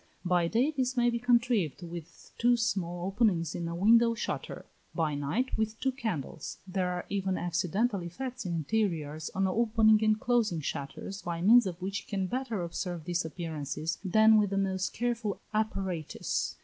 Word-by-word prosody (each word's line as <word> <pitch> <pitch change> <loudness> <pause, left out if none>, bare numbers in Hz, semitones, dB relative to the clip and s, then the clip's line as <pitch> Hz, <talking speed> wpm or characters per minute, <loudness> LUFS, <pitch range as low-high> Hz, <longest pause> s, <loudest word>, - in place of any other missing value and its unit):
By 175 -1 +3
day 240 - +2
this 260 -3 -1
may 240 0 +4
be 235 - -1
contrived 235 - +2
with 170 -1 -9
two 240 +1 +4
small 180 -6 -1
openings 190 -5 +1
in 170 - -3
a 170 - -4
window 230 +5 +5
shutter; - - -4 0.3
by 160 -3 0
night, 145 - -1
with 220 0 -1
two 265 - +1
candles. 220 - -4
There 185 -1 -1
are 180 0 -3
even 195 -2 -1
accidental 185 +5 0
effects 245 +9 -5
in 175 -3 -2
interiors, 160 -4 -1
on 195 0 +2
opening 220 +1 +4
and 215 0 +3
closing 225 -10 +1
shutters, 145 +8 -5
by 170 -1 -3
means 230 +2 +7
of 175 -2 -5
which 200 +2 -3
we - - -20
can 195 -2 -1
better 235 -3 -2
observe 170 0 -4
these 175 +1 -1
appearances 160 -1 -4
than 220 +3 +6
with 205 -2 +2
the 195 - -1
most 190 -1 0
careful 235 -3 -2
apparatus. 190 -7 -2
195 Hz, 170 wpm, -30 LUFS, 170-230 Hz, 0.3 s, means